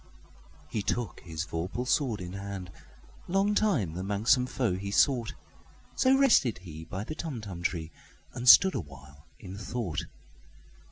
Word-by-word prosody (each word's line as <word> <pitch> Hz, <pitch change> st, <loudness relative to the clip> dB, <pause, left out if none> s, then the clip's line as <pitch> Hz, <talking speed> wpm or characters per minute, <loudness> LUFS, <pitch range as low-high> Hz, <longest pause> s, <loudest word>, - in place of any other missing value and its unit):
He 105 Hz, -, -3 dB
took 120 Hz, +2 st, -2 dB
his 80 Hz, -1 st, -5 dB
vorpal 90 Hz, +10 st, -4 dB
sword 125 Hz, -, +1 dB
in 90 Hz, 0 st, -7 dB
hand:Long 100 Hz, -, -4 dB
time 165 Hz, -, +1 dB
the 90 Hz, -, -5 dB
manxome 110 Hz, +6 st, +2 dB
foe 125 Hz, -6 st, -1 dB
he 100 Hz, +2 st, -4 dB
sought—So 135 Hz, -, 0 dB
rested 230 Hz, -, +4 dB
he 80 Hz, -3 st, -9 dB
by 95 Hz, +5 st, -5 dB
the 155 Hz, -, -6 dB
Tumtum 110 Hz, -, -6 dB
tree, 85 Hz, -2 st, -2 dB, 0.4 s
And 125 Hz, 0 st, +2 dB
stood 190 Hz, +8 st, +9 dB
awhile 70 Hz, -, -9 dB
in 95 Hz, +1 st, -9 dB
thought. 95 Hz, -9 st, -3 dB
100 Hz, 130 wpm, -29 LUFS, 85-125 Hz, 0.4 s, stood